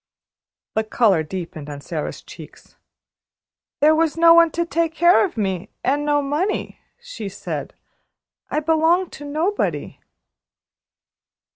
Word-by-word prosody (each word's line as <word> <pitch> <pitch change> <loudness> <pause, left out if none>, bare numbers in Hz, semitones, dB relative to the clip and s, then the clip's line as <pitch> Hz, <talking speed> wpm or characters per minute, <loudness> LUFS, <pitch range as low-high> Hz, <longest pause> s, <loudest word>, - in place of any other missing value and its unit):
The 220 - +1
color 215 -6 +2
deepened 155 -3 -7
on 145 -1 -7
Sara's 155 +1 -5
cheeks. - - -14 1.1
"There 305 +2 +6
was 320 0 +1
no 335 0 +7
one 335 0 +6
to 340 +2 -2
take 330 -1 -1
care 345 +3 +5
of 375 - -3
me, 190 -4 -2
and 285 +3 +1
no 290 -1 +1
money," 305 +9 -2 0.2
she 475 - -7
said. 195 - -6 0.7
"I 305 - -1
belong 325 +4 +2
to - - -10
nobody." 320 +8 -2
300 Hz, 125 wpm, -21 LUFS, 210-335 Hz, 1.1 s, no